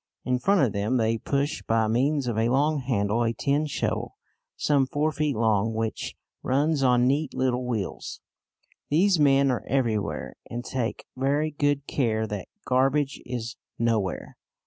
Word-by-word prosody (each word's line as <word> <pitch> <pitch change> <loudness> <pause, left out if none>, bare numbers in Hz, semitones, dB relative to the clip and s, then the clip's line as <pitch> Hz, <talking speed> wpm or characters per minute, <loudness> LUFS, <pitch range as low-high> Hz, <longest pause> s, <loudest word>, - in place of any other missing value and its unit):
In 125 0 +1
front 195 +7 +3
of 120 -7 +2
them 105 +6 0
they 115 -1 +1
push 140 +5 -1
by 110 -1 +1
means 135 +5 +1
of 120 -2 -1
a 115 +1 +1
long 145 +4 +2
handle 115 -4 0
a 115 -1 +1
tin 145 +5 0
shovel, 145 - -2 0.4
some 140 -3 +2
four 150 +4 0
feet 150 -1 -1
long, 110 0 +1
which 110 0 -3 0.3
runs 145 +3 +1
on 125 -2 +4
neat 140 +3 0
little 125 -1 0
wheels. 110 -6 -4 0.7
These 180 +4 +3
men 140 -2 +4
are 115 -5 -2
everywhere, 115 -6 -1
and 120 +1 -5
take 125 -3 -3
very 145 +4 0
good 145 -1 0
care 110 -6 0
that 105 -3 -5 0.2
garbage 135 +2 +1
is 120 -1 -5 0.2
nowhere. 110 -5 -1
130 Hz, 155 wpm, -26 LUFS, 115-145 Hz, 0.7 s, on